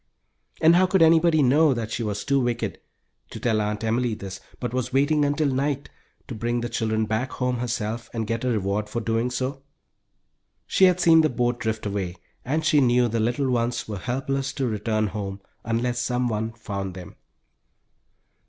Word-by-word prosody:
And 165 +2 +6
how 185 +1 +4
could 185 -2 +4
anybody 160 -1 +5
know 140 +2 +4
that 115 -2 -4
she - - -2
was 105 -2 -2
too 140 0 +2
wicked 120 -2 -2 0.5
to - - -8
tell 110 -3 +1
Aunt 105 +1 -2
Emily 115 +1 0
this, 95 -1 -7 0.2
but 125 -2 -4
was 130 -2 -2
waiting 145 +3 +3
until 145 +2 +1
night, 140 +1 -1 0.4
to - - -6
bring 120 +2 -1
the 120 - -3
children 110 -1 0
back 110 +4 -2
home 125 -1 -1
herself, 115 -1 -3
and 115 -2 -3
get 115 +2 -2
a - - 0
reward 105 -1 -1
for 120 - -2
doing 115 +1 0
so? 130 +2 -3 1.0
She 190 - +4
had 180 -1 +4
seen 165 -2 +6
the 155 - +2
boat 120 0 0
drift 110 -2 -2
away 100 -3 -3 0.3
and 155 +5 -1
she 150 -2 +4
knew 120 -1 +3
the 115 +1 -1
little 120 +4 0
ones 120 0 -1
were 105 -3 -5
helpless 135 +5 -2
to 135 - -2
return 110 0 0
home 100 -1 -4 0.2
unless 120 +2 -1
someone 120 -3 -1
found 100 -5 -5
them. 90 -2 -10
120 Hz, 180 wpm, -24 LUFS, 110-135 Hz, 1.0 s, And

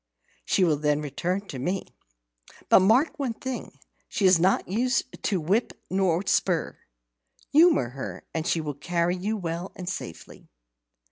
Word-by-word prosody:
She 190 - +2
will 160 -4 +3
then 150 0 +1
return 180 +7 -2
to 130 - -6
me. 180 +9 -2 0.8
But - - +8
mark 230 - +3
one 255 -5 -2
thing, 260 0 -6 0.3
she 205 - 0
is 185 -2 +6
not 185 +3 +2
used 235 +5 +1 0.2
to 195 -3 0
whip 195 +10 0 0.2
or 190 -1 +1
spur. - - 0 0.7
Humour 310 - +5
her, 135 +2 -7
and 160 0 -2
she 165 - +1
will 150 -2 -4
carry 170 +4 0
you 205 +4 -2
well 175 0 -4
and 180 - -8
safely." 85 - -7
185 Hz, 150 wpm, -26 LUFS, 160-210 Hz, 0.8 s, But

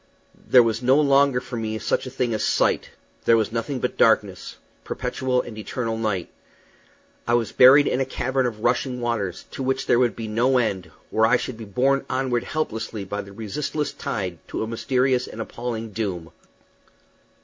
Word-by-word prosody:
There 125 -2 +7
was 115 0 -1
no 130 +3 +4
longer 140 -3 +4
for 125 -1 -7
me 110 -1 -3
such 120 - -1
a - - -4
thing 125 -2 -1
as 110 - -1
sight; - - +1 0.4
there 115 - +5
was 110 -1 0
nothing 120 +4 -2
but 125 - -3
darkness 105 -5 +2 0.3
perpetual 130 -1 -1
and 115 - -9
eternal 115 +1 -3
night. 105 -6 -2 1.0
I 120 - +3
was 115 -2 0
buried 135 +3 +7
in 130 - 0
a - - +1
cavern 130 0 -1
of 110 -3 -6
rushing 125 +1 0
waters, 115 -7 -2
to - - -6
which 135 0 -1
there 120 - +3
would 125 -2 +2
be 115 -1 -5
no 120 +5 +2
end, 95 -8 -1 0.2
where 110 0 +3
I 120 +2 +4
should 125 - -5
be 115 0 -9
borne 135 +7 +1
onward 130 -2 -1
helplessly 115 -8 -3
by 100 +2 -4
the 100 - -12
resistless 135 +8 -3
tide 90 -5 -4
to - - -3
a - - -4
mysterious 125 +2 0
and - - -10
an 115 - -5
appalling 115 -1 -5
doom. 95 -6 -4
120 Hz, 185 wpm, -23 LUFS, 110-130 Hz, 1.0 s, There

